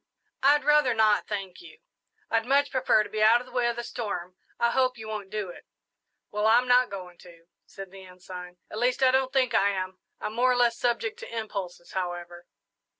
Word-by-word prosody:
"I'd 290 Hz, +2 st, +4 dB
rather 295 Hz, -5 st, +4 dB
not, 215 Hz, -1 st, +3 dB
thank 195 Hz, -, -5 dB
you 350 Hz, -, -14 dB, 0.5 s
I'd 225 Hz, +1 st, +1 dB
much 280 Hz, +2 st, +3 dB
prefer 255 Hz, -5 st, +3 dB
to -, -, -10 dB
be 215 Hz, -, -2 dB
out 225 Hz, +3 st, +6 dB
of 250 Hz, -, -10 dB
the 255 Hz, -, -16 dB
way 245 Hz, -1 st, +1 dB
of 240 Hz, -, -1 dB
the 240 Hz, -, -4 dB
storm. 190 Hz, -7 st, -5 dB, 0.2 s
I 235 Hz, -, +2 dB
hope 255 Hz, -1 st, +1 dB
you 220 Hz, -1 st, -9 dB
won't 210 Hz, -3 st, -5 dB
do 210 Hz, -3 st, -4 dB
it." -, -, -12 dB, 0.6 s
"Well, 210 Hz, +1 st, 0 dB
I'm 245 Hz, +3 st, +4 dB
not 250 Hz, 0 st, +4 dB
going 180 Hz, -3 st, -9 dB
to," 170 Hz, -2 st, -16 dB, 0.2 s
said 195 Hz, -1 st, -10 dB
the 195 Hz, 0 st, -12 dB
Ensign; 180 Hz, -1 st, -10 dB
"at 215 Hz, -, -5 dB
least, 250 Hz, +2 st, +1 dB
I 260 Hz, -, +6 dB
don't 260 Hz, 0 st, +1 dB
think 260 Hz, -4 st, +1 dB
I 200 Hz, -, +4 dB
am. 185 Hz, -1 st, -4 dB, 0.2 s
I'm 210 Hz, -, -4 dB
more 250 Hz, +3 st, +3 dB
or -, -, +2 dB
less 240 Hz, -1 st, +3 dB
subject 425 Hz, -, -1 dB
to 485 Hz, -, -9 dB
impulses, 195 Hz, -5 st, -6 dB
however." 175 Hz, -1 st, -5 dB
220 Hz, 210 wpm, -27 LUFS, 190-250 Hz, 0.6 s, out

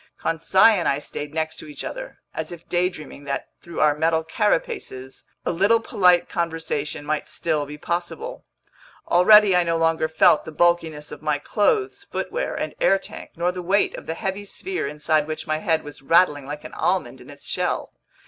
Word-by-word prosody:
Conseil 190 Hz, +6 st, +4 dB
and 170 Hz, -, -1 dB
I 140 Hz, -, +2 dB
stayed 145 Hz, 0 st, -6 dB
next 160 Hz, 0 st, -2 dB
to -, -, -9 dB
each 150 Hz, -, -7 dB
other, -, -, -7 dB, 0.2 s
as -, -, -4 dB
if 170 Hz, -1 st, -10 dB
daydreaming 175 Hz, -5 st, -2 dB
that 140 Hz, -, -3 dB
through 170 Hz, -1 st, -5 dB
our 150 Hz, -1 st, +5 dB
metal 160 Hz, +1 st, +1 dB
carapaces, 160 Hz, -7 st, -2 dB, 0.2 s
a -, -, +1 dB
little 200 Hz, +7 st, +3 dB
polite 180 Hz, -5 st, +3 dB
conversation 160 Hz, -4 st, -3 dB
might 150 Hz, 0 st, -2 dB
still 155 Hz, -3 st, -1 dB
be 150 Hz, +1 st, -8 dB
possible! 175 Hz, -, -4 dB, 0.7 s
Already 200 Hz, +2 st, +7 dB
I 180 Hz, -, +5 dB
no 165 Hz, -1 st, 0 dB
longer 165 Hz, -1 st, +2 dB
felt 160 Hz, -1 st, +4 dB
the -, -, -8 dB
bulkiness 160 Hz, -2 st, +1 dB
of -, -, -9 dB
my 150 Hz, -1 st, 0 dB
clothes, 400 Hz, -, 0 dB
footwear, -, -, -3 dB
and -, -, -3 dB
air 195 Hz, -, +5 dB
tank, 195 Hz, -, -10 dB
nor 175 Hz, +2 st, 0 dB
the 180 Hz, 0 st, -6 dB
weight 195 Hz, +4 st, +1 dB
of -, -, -10 dB
the 160 Hz, -, -2 dB
heavy 195 Hz, +2 st, -3 dB
sphere 370 Hz, -, -4 dB
inside 150 Hz, +1 st, 0 dB
which 155 Hz, 0 st, -4 dB
my 155 Hz, -1 st, -1 dB
head 160 Hz, 0 st, +1 dB
was 145 Hz, -1 st, -10 dB
rattling 145 Hz, -2 st, +3 dB
like 150 Hz, +1 st, -6 dB
an -, -, -10 dB
almond -, -, -1 dB
in -, -, -14 dB
its -, -, -13 dB
shell. -, -, -2 dB
165 Hz, 185 wpm, -23 LUFS, 150-185 Hz, 0.7 s, Already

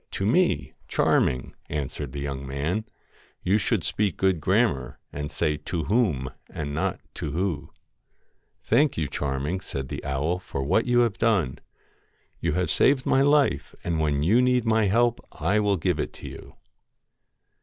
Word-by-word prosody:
To 95 Hz, -, -1 dB
me, 180 Hz, -, +5 dB
THE -, -, -2 dB
FAIR -, -, -20 dB
Charming,' 65 Hz, -, +1 dB
answered 70 Hz, -1 st, -4 dB
the 70 Hz, -, -5 dB
young 70 Hz, -1 st, -4 dB
man: 75 Hz, +11 st, -2 dB, 0.3 s
* -, -, -32 dB
you 100 Hz, +4 st, +3 dB
should 110 Hz, -1 st, +1 dB
MAID -, -, -9 dB
speak 105 Hz, -5 st, 0 dB
good 95 Hz, -4 st, +2 dB
grammar, 95 Hz, -, +1 dB, 0.2 s
and 75 Hz, 0 st, -4 dB
say 75 Hz, +2 st, 0 dB
To 85 Hz, 0 st, -3 dB
whom 85 Hz, -, +1 dB, 0.2 s
and 70 Hz, -2 st, -5 dB
not -, -, 0 dB
GOLDEN -, -, -25 dB
To 75 Hz, -, -4 dB
who.' 90 Hz, -1 st, 0 dB
LOCKS -, -, -30 dB, 0.9 s
'Thank 140 Hz, +5 st, +3 dB
you, 80 Hz, -3 st, 0 dB
Charming,' 70 Hz, +7 st, -2 dB
said 65 Hz, -7 st, -5 dB
the -, -, -5 dB
owl, 75 Hz, +6 st, -1 dB
'for 70 Hz, -6 st, -4 dB
what 95 Hz, -, +2 dB
you 120 Hz, 0 st, +4 dB
have 115 Hz, -6 st, 0 dB
done. 95 Hz, -, +1 dB, 0.8 s
You 80 Hz, -2 st, 0 dB
have 90 Hz, +2 st, 0 dB
saved 135 Hz, -1 st, +3 dB
my 135 Hz, -, +3 dB
life, 140 Hz, -, +2 dB
and 85 Hz, -2 st, -1 dB
when 75 Hz, -2 st, +1 dB
you 110 Hz, +10 st, +4 dB
need 125 Hz, -1 st, +2 dB
my 110 Hz, -1 st, +3 dB
help 120 Hz, +4 st, +2 dB
I 95 Hz, +8 st, +1 dB
will 100 Hz, -2 st, +2 dB
give 80 Hz, -, 0 dB
it -, -, -5 dB
you.' -, -, -9 dB
90 Hz, 180 wpm, -26 LUFS, 75-110 Hz, 0.9 s, me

